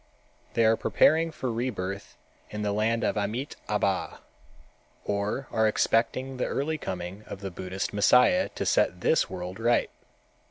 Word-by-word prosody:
They 115 - +4
are 110 +1 +5
preparing 160 +7 +3
for 130 -5 -3
rebirth 100 -5 -4 0.3
in 105 0 -4
the 105 - 0
land 110 +2 +1
of - - +1
Amitâbha, 105 -3 -2 0.9
or 105 +6 -2
are 110 -1 +3
expecting 125 +4 +1
the 125 - 0
early 155 +3 -2
coming 90 0 -5
of 100 - -8
the 95 -1 -5
Buddhist 95 +3 -4
Messiah 125 +4 +4
to - - -2
set 90 0 +2
this 160 - +2
world 90 +1 -6
right. 120 +1 +2
110 Hz, 145 wpm, -27 LUFS, 100-125 Hz, 0.9 s, are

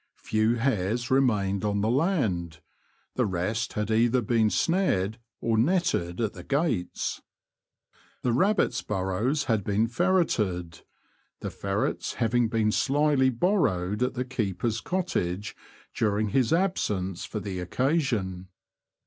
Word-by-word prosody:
Few 110 +2 +1
hares 120 0 -1
remained 105 -8 +2
on 100 -1 0
the 105 - +1
land; 110 - 0 0.5
the 125 -3 +1
rest 100 +6 -2
had 105 +1 -2
either 120 +2 +3
been 110 0 +2
snared 110 - +1 0.2
or 115 -1 +1
netted 130 - +1
at 110 -3 -1
the 90 -4 -10
gates. 135 - -1 1.0
The 125 - +1
rabbits' 195 - +2
burrows 105 +9 -1
had 110 -7 0
been 105 +3 +1
ferreted, 110 - 0 0.6
the - - -4
ferrets 100 +1 -2
having 120 0 +1
been 110 -2 +1
slyly 140 +1 +3
borrowed 115 - +1
at 125 0 0
the 125 0 -2
keeper's 110 -2 -2
cottage 105 - -2 0.4
during 105 -1 0
his 125 +2 +2
absence 105 - 0
for 110 - -4
the 95 -2 -5
occasion. 105 - -1
110 Hz, 125 wpm, -27 LUFS, 95-130 Hz, 1.0 s, either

